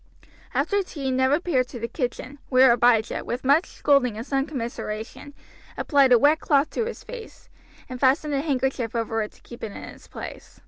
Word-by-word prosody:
After 405 0 +1
tea 285 -8 -4
Ned 260 0 +2
repaired 290 -4 +1
to 245 - -8
the 230 - -3
kitchen, 255 +2 -4
where 255 -1 +6
Abijah, 235 -2 +2
with 245 +2 -4
much 285 +6 +3
scolding 255 -6 +2
and 225 - -5
some 275 0 -1
commiseration, 235 0 -6 0.4
applied 280 -4 +3
a 245 - +8
wet 295 +5 +4
cloth 285 0 +2
to 460 - -1
his 475 - -7
face, 485 -3 -11 0.4
and 255 -1 -7
fastened 285 +3 +2
a 275 - +1
handkerchief 265 -5 -1
over 225 -1 -1
it 210 - -5
to - - -22
keep 240 - -12
it 220 - -4
in - - -9
its - - -12
place. - - -10
265 Hz, 190 wpm, -24 LUFS, 240-290 Hz, 0.4 s, a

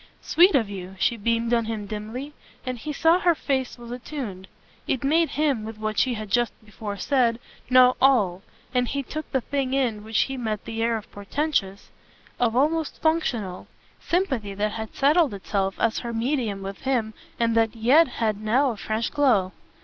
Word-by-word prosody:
"Sweet 350 0 +5
of 230 -6 +3
you." 190 -1 -7
She 235 - +2
beamed 230 +2 0
on 230 -1 +2
him 220 -2 -4
dimly, 220 +8 -6 0.3
and 255 -2 -3
he 300 +6 -5
saw 325 +4 +3
her 345 -2 +3
face 265 -4 -2
was 240 0 -10
attuned. 245 -7 -6 0.4
It 260 - -1
made 320 +4 +3
him, 285 -7 +1
with 220 0 -7
what 215 -1 -2
she 255 -2 +2
had 215 -2 -7
just 240 +1 +2
before 210 -1 -6
said, 240 -1 +2 0.3
know 255 0 +6
all, 210 -9 +3 0.3
and 250 -1 +2
he 280 +2 -2
took 310 +4 -6
the 265 - +1
thing 270 0 -1
in 235 -6 0
while 220 - -11
he 265 +4 +1
met 220 -4 -3
the 225 0 -4
air 230 0 +1
of 215 - -11
portentous, 205 -2 -2 0.5
of 235 -2 +2
almost 310 +4 +1
functional, 240 - -1 0.3
sympathy 265 - -1
that 210 +1 0
had 220 0 -6
settled 295 - +3
itself 195 0 -2
as 230 - +1
her 235 -1 -5
medium 225 -4 -1
with 195 0 -6
him 240 -5 0 0.3
and 230 -1 +2
that 225 0 +2
yet 260 +9 +5
had 215 -4 -2
now 250 +5 +2
a 225 - -7
fresh 220 +3 -2
glow. 245 -11 +3
235 Hz, 185 wpm, -25 LUFS, 215-275 Hz, 0.5 s, know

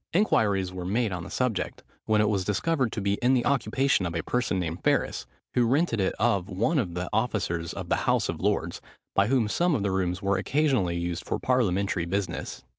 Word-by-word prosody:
Inquiries 100 - +2
were 90 -1 -5
made 105 +4 0
on 90 -2 -4
the - - -8
subject, 125 -6 -2 0.2
when 110 -1 +3
it 105 - +3
was 100 -3 +1
discovered 130 - 0
to 110 - -3
be 100 +1 0
in 125 +2 +4
the 120 - +1
occupation 130 -5 +1
of 85 - -5
a 80 - -1
person 120 -7 0
named 85 0 -4
Ferris, - - 0 0.3
who 120 -1 +3
rented 135 -2 +1
it 95 - 0
of 105 -5 +1
one 115 - +1
of 90 -8 -2
the 90 +1 -3
officers 100 -7 -1
of - - -6
the - - +2
House - - +1
of - - -4
Lords, - - -1 0.3
by 100 +1 +3
whom 125 -3 +2
some 170 +8 +1
of 105 - -1
the 100 - 0
rooms 90 -1 -1
were 100 -1 0
occasionally 130 - +1
used 85 0 -3
for - - -2
parliamentary 100 -8 +1
business. 90 0 -3
105 Hz, 210 wpm, -27 LUFS, 90-125 Hz, 0.3 s, in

